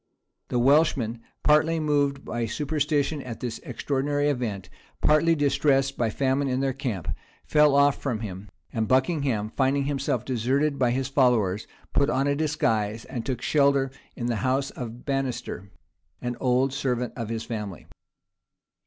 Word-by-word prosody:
The - - -1
Welshmen, 125 -3 +3 0.2
partly 155 +2 +4
moved 145 -2 +1
by 120 -1 -2
superstition 150 +2 0
at 120 -4 -7
this 120 -2 -4
extraordinary 145 +1 -1
event, 110 -8 -3 0.3
partly 160 +2 +4
distressed 140 -2 +2
by 115 -2 0
famine 135 +4 0
in 130 0 0
their 135 -1 0
camp, 120 - -4 0.4
fell 150 -2 +4
off 140 0 +4
from 120 -6 -2
him; 100 -1 -7 0.2
and 110 -1 0
Buckingham, 130 -5 +1
finding 140 +1 +2
himself 135 -4 -1
deserted 135 +4 0
by 125 -2 +3
his 130 +1 0
followers, 120 -8 +2 0.3
put 140 0 +3
on 135 -1 +1
a 140 0 +2
disguise, 115 -8 0
and 120 -3 -5
took 125 -3 -3
shelter 140 -2 +3 0.2
in 120 - -4
the 120 -2 0
house 130 +3 0
of 120 -1 -8
Banister, 135 -8 -3 0.5
an 120 0 -3
old 130 +1 +2
servant 125 -4 -1
of 115 -3 -4
his 115 -1 -3
family. 105 -6 -6
135 Hz, 150 wpm, -26 LUFS, 120-140 Hz, 0.5 s, partly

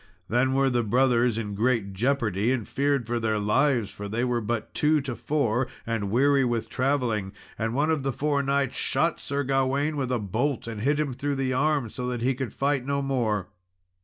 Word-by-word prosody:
Then 130 +3 +2
were 135 -1 +3
the 120 -1 +2
brothers 120 0 +2
in 105 -3 -3
great 110 -2 0
jeopardy, 115 -1 +1
and 125 -5 -1
feared 140 -2 0
for 120 +1 -1
their 110 -1 0
lives, 105 +2 +2
for 100 0 -7
they 115 +3 -1
were 125 -1 0
but 110 0 -3
two 150 +1 +3
to 135 -3 -4
four, 130 -4 0 0.2
and 115 -4 -2
weary 135 +5 +3
with 115 -3 -1
travelling; 125 -7 0 0.2
and 115 +1 -2
one 150 +3 +2
of 155 -3 0
the 135 0 -1
four 145 +2 0
knights 140 -1 0
shot - - +1
Sir 140 +1 -2
Gawain 135 +3 0
with 130 -2 -1
a 125 - +2
bolt, 120 +5 -1
and 115 -2 -5
hit 145 +5 +1
him 145 -4 -1
through 140 +3 -2
the 135 -1 -1
arm, 145 -1 +1
so 125 - -4
that 120 -2 -3
he 130 +2 +2
could 130 -3 -4
fight 140 -1 0
no 140 +1 -1
more. 115 -8 -1
125 Hz, 205 wpm, -26 LUFS, 115-140 Hz, 0.2 s, were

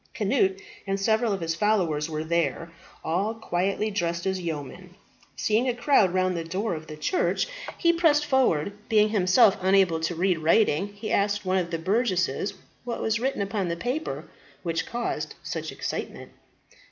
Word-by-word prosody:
Cnut 385 -1 +1 0.3
and 195 0 -1
several 220 +3 +2
of 195 -2 -2
his 165 0 -1
followers 170 -6 +1
were 155 -1 -3
there, 170 0 -1 0.3
all 195 +7 -1
quietly 200 0 -1
dressed 170 -3 -2
as 190 -1 -1
yeomen. 170 +3 -6 0.4
Seeing 225 +4 +1
a 245 - -1
crowd 245 -7 +3
round 185 0 +1
the 165 - -2
door 185 +5 -2
of 155 -1 -7
the 155 - -8
church, 360 - 0 0.3
he 340 -1 +3
pressed 310 -3 +3
forward. 205 - +2 0.2
Being 215 -1 +4
himself 205 +1 +4
unable 190 -3 +3
to 165 +2 -2
read 180 0 +1
writing, 165 +2 +3
he 205 +2 -7
asked 205 0 +1
one 185 0 +2
of 175 -2 -3
the 165 - -2
burgesses 185 - 0 0.3
what 240 -1 -4
was 220 0 0
written 260 -4 -1
upon 200 -2 -2
the 170 0 -2
paper 255 - -3 0.4
which 165 -2 -2
caused 240 0 -3
such - - -4
excitement. - - -5
195 Hz, 165 wpm, -26 LUFS, 170-220 Hz, 0.4 s, Being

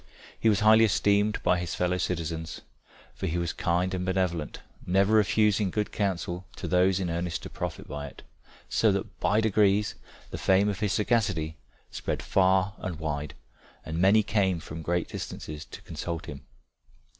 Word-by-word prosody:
He 115 - +3
was 105 -2 +2
highly 110 +1 +7
esteemed 105 +1 +2
by 90 - +3
his 85 -1 -3
fellow 90 0 0
citizens, 80 -2 -3 0.5
for 95 - -4
he 85 0 -1
was 85 -1 -1
kind 90 +2 0
and 90 -1 -2
benevolent, 90 -4 -1 0.2
never 95 +4 +2
refusing 105 -1 +3
good 105 +3 -2
counsel 90 -3 -2
to - - -5
those 90 +1 +3
in 95 - -1
earnest 85 0 -3
to - - -8
profit - - -5
by 75 0 -5
it, - - -13 0.4
so - - +3
that - - -4
by 105 +2 +2
degrees 105 -1 +3 0.4
the - - -5
fame 95 +2 +3
of 100 -1 -3
his 105 -2 0
sagacity 100 -9 0 0.3
spread - - -3
far 95 0 +3
and 90 -4 -4
wide, 75 -3 -3 0.5
and 80 +1 -3
many 100 +4 +5
came 95 -4 +1
from 80 +1 -8
great 85 +1 -1
distances 75 0 -6
to - - -11
consult 85 +1 -5
him. 70 -2 -8
95 Hz, 170 wpm, -28 LUFS, 85-100 Hz, 0.5 s, highly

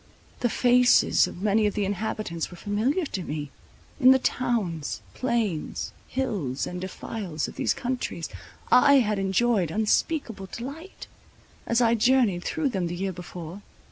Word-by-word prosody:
The 240 - +1
faces 250 +1 +4
of 180 - -9
many 215 +1 +3
of 205 - -3
the 205 -2 0
inhabitants 200 -4 -3
were 175 - -11
familiar 225 - 0
to 195 - -4
me; 150 -3 -5 0.5
in 255 -2 +7
the 265 - +8
towns, 215 - -1
plains, 230 -10 -2 0.2
hills, 200 - -2
and 180 0 -5
defiles 185 -3 -4
of - - -10
these - - 0
countries, 250 -9 -3 0.4
I 280 +3 +7
had 215 -6 +3
enjoyed 195 -1 +2
unspeakable 220 - 0
delight, 285 +10 -8 0.6
as 235 +1 +2
I 230 -1 +4
journied 235 -6 +3
through 305 -4 -1
them 190 -7 -1
the 175 - -4
year 190 +1 -2
before. 175 +2 -8
210 Hz, 145 wpm, -26 LUFS, 180-245 Hz, 0.6 s, the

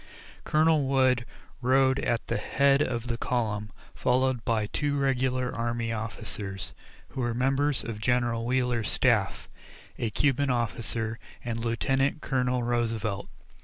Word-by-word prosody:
Colonel 155 -2 +3
Wood 130 -3 +3 0.3
rode 130 +1 +3
at 120 -2 0
the - - -1
head 140 +6 +3
of 120 -4 -1
the 120 -1 -3
column, 105 -4 -1 0.2
followed 130 -1 +1
by 115 -3 +1
two 145 +6 -1
regular 130 -2 +1
army 115 0 -2
officers 105 -3 -5 0.4
who 130 - -4
were 120 -1 -1
members 135 +3 +1
of 110 -2 -5
General 120 -1 +1
Wheeler's 125 -2 0
staff, - - +1 0.5
a 115 - 0
Cuban 140 +4 +1
officer, 115 -2 -1 0.3
and 115 -1 -2
Lieutenant 135 +5 +1
Colonel 125 -3 0
Roosevelt. 115 -4 -1
120 Hz, 130 wpm, -28 LUFS, 115-130 Hz, 0.5 s, Colonel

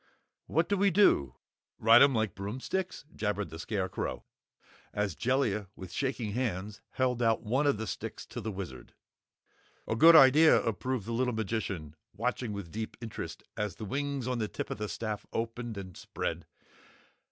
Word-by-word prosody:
"What 165 +3 +1
do 200 - +1
we 200 +1 +4
do 195 - +4 0.4
ride 115 +2 +7
'em 140 -2 +6
like 110 -4 0
broomsticks?" 130 - -4
jabbered 105 -1 -2
the 80 - -8
Scarecrow, 95 0 -3 0.7
as 105 -3 0
Jellia 115 - 0
with 95 -2 -9
shaking 130 -6 -2
hands 105 -3 -3
held 125 -2 0
out 115 -1 +2
one 130 +7 +1
of 140 - +3
the 110 - -3
sticks - - -5
to - - -7
the 110 - -3
Wizard. 90 -11 -8 0.9
"A - - 0
good 165 +8 +8
idea!" 155 +2 +8
approved 115 +1 -2
the 115 - -4
little 125 0 0
magician, 95 -8 -3 0.2
watching 120 0 -2
with 100 -5 -6
deep 110 +1 -5
interest 115 -3 -6
as 105 -4 -2
the 110 - -6
wings 140 +2 -2
on 125 -2 -1
the 110 - 0
tip - - -5
of - - -4
the 105 -1 -3
staff 110 -2 -4
opened 115 -1 -3
and 95 -3 -7
spread. - - -4
115 Hz, 165 wpm, -30 LUFS, 105-130 Hz, 0.9 s, good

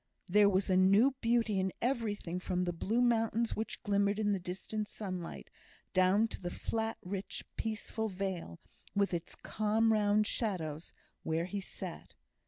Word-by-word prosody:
There 205 +2 +6
was 190 0 +2
new 195 +8 +5
beauty 230 -3 +2
in 190 0 0
everything: 210 -8 -1
from 180 0 -1
the 175 -1 -1
blue 220 +8 0
mountains 230 -1 +2
which 220 - -4
glimmered 200 -1 +2
in 210 -1 +1
the 195 - +1
distant 190 +4 -4
sunlight, 185 -6 -6 0.4
down 190 +4 +4
to - - -7
the 175 - -3
flat, 225 +4 -2
rich, 195 +2 -4
peaceful 220 0 -2
vale, 185 - -4 0.4
with 200 -1 +2
its 170 0 -4
calm 220 +1 +1
round 210 0 +3
shadows, 170 -9 -2 0.3
where 160 +1 0
he 200 +2 -3
sat. - - -7
205 Hz, 150 wpm, -33 LUFS, 185-220 Hz, 0.4 s, There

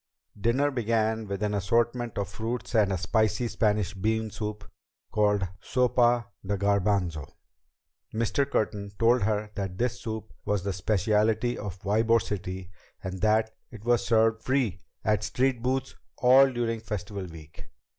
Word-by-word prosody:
Dinner 120 +8 +1
began 110 -3 0
with 100 +1 -3
an 105 0 0
assortment 115 +4 0
of 100 - -1
fruits 110 +5 -4
and 105 -4 +3
a 95 - 0
spicy 110 +6 +1
Spanish 105 -4 +1
bean 110 +2 -1
soup 105 0 -5 0.4
called 105 -2 +2
Sopa 120 -1 +2 0.2
de 100 +1 -1
Garbanzo. 95 -6 0 0.8
Mr. 115 +5 0
Curtin 105 -5 -1
told 120 +1 +4
her 105 0 0
that 95 -3 -4
this 125 +1 -1
soup 110 -1 -5
was 105 -3 -1
the 100 -1 -1
speciality 105 +5 +1
of 100 -4 -6
Ybor 110 +3 +3
City 95 -3 -5 0.3
and 95 0 -5
that 110 +1 +3 0.2
it 110 -3 -11
was 120 -1 +3
served 115 0 +3
free 125 -9 0 0.2
at 105 -1 +2
street 125 +3 0
booths 130 +2 -1 0.2
all 130 +2 +6
during 115 -2 -1
Festival 105 -3 -5
Week. 80 -2 -12
110 Hz, 145 wpm, -27 LUFS, 100-115 Hz, 0.8 s, all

